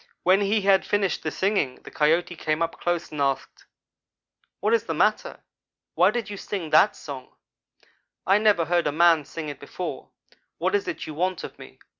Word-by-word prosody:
When 190 Hz, +3 st, +4 dB
he 205 Hz, +2 st, +1 dB
had 195 Hz, -1 st, +4 dB
finished 200 Hz, -3 st, 0 dB
the 155 Hz, -, -2 dB
singing, 190 Hz, -9 st, 0 dB
the -, -, -11 dB
Coyote 165 Hz, +4 st, +1 dB
came 155 Hz, 0 st, -1 dB
up 165 Hz, -, -4 dB
close 175 Hz, -1 st, -2 dB
and 150 Hz, -2 st, -4 dB
asked: 135 Hz, -1 st, -2 dB, 0.9 s
"'What 210 Hz, +4 st, +1 dB
is 230 Hz, -1 st, +2 dB
the -, -, -3 dB
matter? -, -, 0 dB, 0.5 s
Why 180 Hz, +2 st, +4 dB
do 240 Hz, +3 st, -1 dB
you 205 Hz, -, -7 dB
sing 185 Hz, -6 st, -5 dB
that 170 Hz, +7 st, +5 dB
song? 135 Hz, -3 st, -9 dB, 0.9 s
I 195 Hz, +3 st, +4 dB
never 210 Hz, -6 st, +3 dB
heard 175 Hz, 0 st, +1 dB
a -, -, +1 dB
man 165 Hz, -1 st, +4 dB
sing 155 Hz, +2 st, -7 dB
it 145 Hz, -2 st, -7 dB
before. 175 Hz, +5 st, -6 dB, 0.5 s
What -, -, -1 dB
is 405 Hz, -2 st, 0 dB
it 365 Hz, -, -4 dB
you 155 Hz, -, -7 dB
want 180 Hz, +3 st, -1 dB
of -, -, -9 dB
me?' -, -, -13 dB
175 Hz, 190 wpm, -25 LUFS, 155-200 Hz, 0.9 s, that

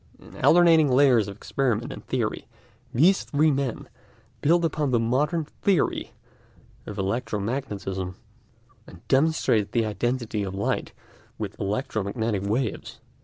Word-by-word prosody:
In -, -, -13 dB
alternating 165 Hz, -3 st, +6 dB
layers 125 Hz, -5 st, +4 dB
of 100 Hz, -, -7 dB
experiment 125 Hz, +1 st, -1 dB
and -, -, -10 dB
theory -, -, -2 dB, 0.4 s
these 180 Hz, +10 st, +4 dB
three 150 Hz, +2 st, +2 dB
men 135 Hz, -4 st, -2 dB, 0.5 s
built 170 Hz, +3 st, +3 dB
up 155 Hz, -3 st, -1 dB
the 120 Hz, -2 st, +2 dB
modern 150 Hz, +8 st, 0 dB
theory 185 Hz, +2 st, -1 dB, 0.7 s
of 105 Hz, -, -6 dB
electromagnetism, 100 Hz, -3 st, -3 dB, 0.7 s
and 85 Hz, -, -15 dB
demonstrated 135 Hz, -7 st, +2 dB
the 115 Hz, -2 st, +2 dB
identity 115 Hz, +1 st, -2 dB
of 95 Hz, -1 st, -4 dB
light 100 Hz, -, -2 dB, 0.4 s
with -, -, -5 dB
electromagnetic 105 Hz, 0 st, -2 dB
waves. 110 Hz, +3 st, -2 dB
120 Hz, 120 wpm, -25 LUFS, 105-145 Hz, 0.7 s, alternating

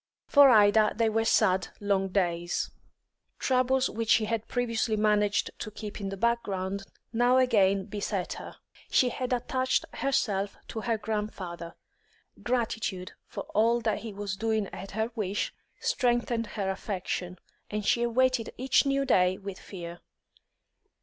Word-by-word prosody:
For 285 Hz, -2 st, +7 dB
Ida 215 Hz, -2 st, +5 dB
they 230 Hz, 0 st, +2 dB
were 225 Hz, +1 st, +1 dB
sad, 190 Hz, -4 st, +3 dB
long 200 Hz, -2 st, +1 dB
days. 175 Hz, -3 st, -1 dB, 0.7 s
Troubles 260 Hz, 0 st, +2 dB
which 225 Hz, 0 st, -4 dB
she 220 Hz, -, +5 dB
had 225 Hz, 0 st, -2 dB
previously 230 Hz, -2 st, 0 dB
managed 210 Hz, -1 st, +2 dB
to -, -, -4 dB
keep 210 Hz, 0 st, -7 dB
in 195 Hz, -, -3 dB
the 195 Hz, -, -5 dB
background 200 Hz, -3 st, -1 dB, 0.3 s
now 245 Hz, +2 st, +4 dB
again 200 Hz, -7 st, +3 dB
beset 200 Hz, -3 st, -3 dB
her. -, -, -9 dB, 0.3 s
She 250 Hz, -, +4 dB
had 255 Hz, +1 st, -4 dB
attached 255 Hz, +1 st, 0 dB
herself 205 Hz, -7 st, 0 dB
to 220 Hz, -, -4 dB
her 230 Hz, 0 st, 0 dB
grandfather; 205 Hz, -6 st, -4 dB, 0.7 s
gratitude 225 Hz, -6 st, -2 dB, 0.2 s
for -, -, -6 dB
all 230 Hz, +2 st, +3 dB
that 220 Hz, -2 st, 0 dB
he 225 Hz, -, -7 dB
was 200 Hz, -1 st, -4 dB
doing 220 Hz, +1 st, 0 dB
at 195 Hz, +2 st, -8 dB
her 220 Hz, +3 st, -1 dB
wish 205 Hz, -2 st, -2 dB, 0.3 s
strengthened 240 Hz, -2 st, 0 dB
her 195 Hz, -3 st, -2 dB
affection, 185 Hz, -2 st, -4 dB, 0.3 s
and 210 Hz, -1 st, -3 dB
she 235 Hz, -, +3 dB
awaited 240 Hz, 0 st, +2 dB
each 265 Hz, +2 st, +3 dB
new 275 Hz, 0 st, +1 dB
day 185 Hz, -7 st, +3 dB
with 195 Hz, -1 st, -7 dB
fear. 175 Hz, -3 st, -8 dB
215 Hz, 145 wpm, -28 LUFS, 195-235 Hz, 0.7 s, For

